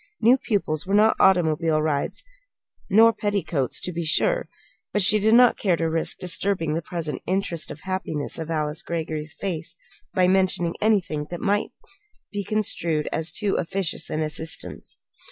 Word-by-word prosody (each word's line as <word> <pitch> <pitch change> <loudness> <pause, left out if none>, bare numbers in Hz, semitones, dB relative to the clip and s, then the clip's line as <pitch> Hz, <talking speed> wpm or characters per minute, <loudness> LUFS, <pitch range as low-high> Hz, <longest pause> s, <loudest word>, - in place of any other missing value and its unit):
New 240 +3 +5
pupils 195 - -2
were 195 - +1
not 215 +1 +5
automobile 165 -4 +3
rides 150 -2 -1 0.7
nor 225 +3 +6
petticoats, 195 - -1
to 180 - -4
be 170 0 -3
sure - - +1 0.4
but 205 - +2
she 210 +3 +5
did 220 +2 +4
not 245 0 +5
care 185 -4 +2
to 165 0 -1
risk 160 0 -1
disturbing 180 -2 +1
the 165 - -1
present 165 -2 -5
interested 175 -5 -2
happiness 185 -6 -2
of 160 0 -5
Alice 150 -1 -1
Greggory's 160 -2 -4
face 170 -5 -5 0.4
by 185 -1 +4
mentioning 185 -2 +2
anything 180 -9 +1
that 175 - -6
might 205 0 0 0.6
be 205 0 -3
construed 170 -7 0
as 160 +1 0
too 205 -2 0
officious 185 0 -2
an 155 - -1
assistance. 155 +1 -3
175 Hz, 155 wpm, -24 LUFS, 160-200 Hz, 0.7 s, nor